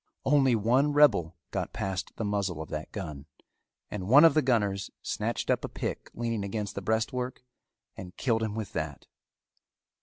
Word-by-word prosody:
Only 135 Hz, -3 st, +4 dB
one 125 Hz, +7 st, +2 dB
rebel 90 Hz, -, +4 dB, 0.2 s
got -, -, -3 dB
past 95 Hz, -1 st, -3 dB
the 110 Hz, -, -3 dB
muzzle 100 Hz, -5 st, -1 dB
of 80 Hz, -, -6 dB
that 75 Hz, 0 st, -5 dB
gun 75 Hz, -8 st, -6 dB, 0.6 s
and 95 Hz, -3 st, -4 dB
one 145 Hz, +8 st, +8 dB
of 165 Hz, -, +7 dB
the 155 Hz, -, +4 dB
gunners 105 Hz, -7 st, +1 dB
snatched -, -, -1 dB
up -, -, +1 dB
a -, -, -3 dB
pick -, -, -4 dB
leaning 115 Hz, -3 st, -2 dB
against 100 Hz, 0 st, -3 dB
the 100 Hz, -, -4 dB
breastwork 125 Hz, +5 st, -1 dB, 0.5 s
and 90 Hz, -1 st, -10 dB
killed 115 Hz, -4 st, +1 dB
him 110 Hz, -2 st, -2 dB
with 110 Hz, -3 st, -5 dB
that. 75 Hz, -3 st, -4 dB
105 Hz, 170 wpm, -29 LUFS, 95-125 Hz, 0.6 s, one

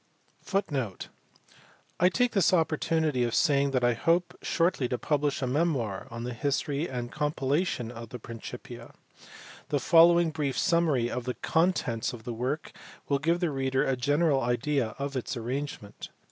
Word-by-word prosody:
* -, -, -37 dB, 1.5 s
I 180 Hz, -, +5 dB
take 245 Hz, +5 st, +1 dB
this 195 Hz, -3 st, +3 dB
opportunity 160 Hz, -4 st, +1 dB
of 120 Hz, -1 st, -1 dB
saying 140 Hz, -1 st, +3 dB
that 130 Hz, -2 st, 0 dB
I 120 Hz, 0 st, +4 dB
hope 170 Hz, +8 st, +1 dB
shortly 165 Hz, -7 st, +1 dB
to 125 Hz, -, -1 dB
publish 145 Hz, -1 st, 0 dB
a -, -, +2 dB
memoir 130 Hz, -, -1 dB
on 115 Hz, 0 st, -6 dB
the 125 Hz, 0 st, -4 dB
history 140 Hz, +5 st, -1 dB
and 120 Hz, -2 st, -4 dB
compilation 145 Hz, -3 st, -1 dB
of 115 Hz, -2 st, -9 dB
the 125 Hz, -, -6 dB
Principia. 120 Hz, +2 st, -9 dB, 0.7 s
The 145 Hz, -, +1 dB
following 170 Hz, +3 st, +5 dB
brief 145 Hz, -5 st, -2 dB
summary 155 Hz, -8 st, +2 dB
of 125 Hz, -1 st, -4 dB
the 125 Hz, -, -2 dB
contents 145 Hz, -10 st, 0 dB
of 115 Hz, -2 st, -9 dB
the 120 Hz, 0 st, -4 dB
work 130 Hz, +7 st, -3 dB, 0.4 s
will 140 Hz, -1 st, +2 dB
give 170 Hz, +5 st, +1 dB
the 170 Hz, -3 st, +1 dB
reader 135 Hz, 0 st, 0 dB
a 135 Hz, -, +1 dB
general 145 Hz, +3 st, +2 dB
idea 120 Hz, -1 st, 0 dB
of 140 Hz, 0 st, -4 dB
its 130 Hz, 0 st, -3 dB
arrangement. 120 Hz, -3 st, -5 dB
140 Hz, 160 wpm, -28 LUFS, 120-160 Hz, 1.5 s, I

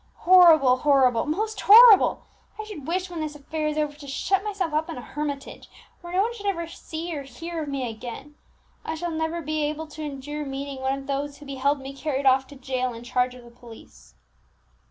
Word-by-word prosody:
Horrible! 330 Hz, -8 st, +6 dB
horrible! 260 Hz, -4 st, +3 dB
most 430 Hz, +8 st, -2 dB
horrible! 445 Hz, -1 st, +8 dB, 0.4 s
I -, -, -3 dB
should 405 Hz, -11 st, -9 dB
wish, 365 Hz, +2 st, -2 dB
when 340 Hz, -, -5 dB
this 305 Hz, -1 st, -4 dB
affair 305 Hz, +2 st, -4 dB
is 305 Hz, 0 st, -2 dB
over, 300 Hz, -1 st, -1 dB
to 290 Hz, -2 st, -11 dB
shut 385 Hz, +8 st, 0 dB
myself 390 Hz, -6 st, -3 dB
up 310 Hz, +1 st, 0 dB
in -, -, -6 dB
a -, -, -6 dB
hermitage, 290 Hz, -2 st, -6 dB, 0.3 s
where 345 Hz, -1 st, -9 dB
no 370 Hz, +2 st, +2 dB
one 465 Hz, +2 st, -2 dB
should 410 Hz, -3 st, -7 dB
ever 340 Hz, -4 st, -1 dB
see 330 Hz, 0 st, -7 dB
or 285 Hz, -, -4 dB
hear 325 Hz, +6 st, -7 dB
of 300 Hz, -, -5 dB
me 270 Hz, -3 st, -3 dB
again. 240 Hz, +6 st, -8 dB, 0.5 s
I 320 Hz, -, -4 dB
shall 345 Hz, +1 st, -4 dB
never 320 Hz, +1 st, -3 dB
be 310 Hz, +1 st, -2 dB
able 305 Hz, +2 st, -2 dB
to 310 Hz, +1 st, -9 dB
endure 295 Hz, 0 st, -5 dB
meeting 275 Hz, -1 st, -6 dB
one 265 Hz, +1 st, 0 dB
of 275 Hz, -, -9 dB
those 280 Hz, +1 st, -3 dB
who 295 Hz, -, -13 dB
beheld 275 Hz, +1 st, -1 dB
me 270 Hz, +1 st, -8 dB
carried 275 Hz, -1 st, -3 dB
off 265 Hz, 0 st, +4 dB
to 285 Hz, -, -13 dB
jail 255 Hz, -2 st, -3 dB
in 230 Hz, -, -10 dB
charge 250 Hz, 0 st, 0 dB
of 250 Hz, -, -13 dB
the 235 Hz, -, -15 dB
police!" 235 Hz, -2 st, -16 dB
295 Hz, 215 wpm, -25 LUFS, 270-330 Hz, 0.5 s, horrible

